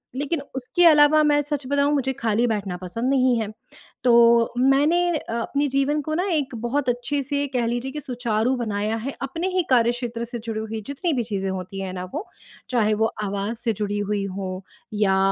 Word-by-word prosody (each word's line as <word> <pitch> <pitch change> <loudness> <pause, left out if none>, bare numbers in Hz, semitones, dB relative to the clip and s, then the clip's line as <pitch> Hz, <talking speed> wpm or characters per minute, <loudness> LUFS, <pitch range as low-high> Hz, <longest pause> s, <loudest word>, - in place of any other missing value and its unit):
लेकिन 285 +3 -2
उसके 305 +7 +1
अलावा 305 -1 +7
मैं 290 -1 +3
सच 290 -2 -3
बताऊँ 285 +1 +2
मुझे 265 -2 +1
खाली 225 +1 +1
बैठना 200 -5 -2
पसंद 190 +8 -3
नहीं 255 -2 +3
है, 215 - -2 0.6
तो 235 -1 +5
मैंने 285 +6 +4 0.2
अ, 230 - -7
अपने 280 +5 0
जीवन 275 +2 +1
को 310 +2 -4
ना 360 +3 0
एक 275 -5 -1
बहुत 255 +2 0
अच्छे 245 +4 -1
से 285 +1 -1
कह 245 -2 +1
लीजिए 245 +3 -2
कि 300 - -5
सुचारू 245 -2 0
बनाया 215 -1 -1
है, 260 +5 -4
अपने 330 +7 -2
ही 365 - +3
कार्यक्षेत्र 240 -1 +1
से 240 0 -6
जुड़ी 225 -1 -4
हुई 220 0 -5
जितनी 310 +4 -1
भी 245 -4 0
चीज़ें 195 -3 -3
होती 190 +1 -5
हैं 185 -1 -4
ना 180 - -5
वो, 315 +8 -3 0.4
चाहे 220 -4 +2
वो 220 +1 +1
आवाज़ 205 +3 -3
से 230 -2 -1
जुड़ी 205 0 -2
हुई 205 -1 -1
हों 190 -1 -5 0.3
या 200 -2 +2
240 Hz, 195 wpm, -23 LUFS, 215-280 Hz, 0.6 s, अलावा